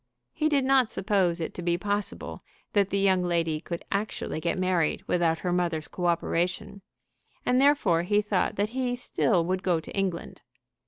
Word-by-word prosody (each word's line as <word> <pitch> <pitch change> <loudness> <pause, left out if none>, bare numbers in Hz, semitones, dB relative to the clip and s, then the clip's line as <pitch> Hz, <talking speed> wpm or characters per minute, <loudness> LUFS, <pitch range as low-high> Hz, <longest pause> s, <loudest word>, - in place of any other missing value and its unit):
He 310 - +1
did 280 -3 +2
not 265 -3 +4
suppose 185 -3 +1
it 165 - -4
to - - -6
be 175 0 +1
possible 205 +2 -3 0.3
that 200 -2 +3
the 195 - 0
young 190 -2 +3
lady 165 -3 0
could 170 0 -6
actually 200 -5 -2
get 170 +2 -1
married 185 -4 0
without 170 -2 +1
her 180 - +1
mother's 170 -3 -1
co 175 -1 -3
operation, 175 +4 -1 0.6
and 250 +1 +3
therefore 270 - +4
he 205 +4 +2
thought 205 -3 0
that 205 +1 0
he 250 0 -1
still 205 -7 +1
would 185 +1 -1
go 180 -4 +1
to - - -9
England. 190 -4 -3
185 Hz, 175 wpm, -27 LUFS, 170-210 Hz, 0.6 s, not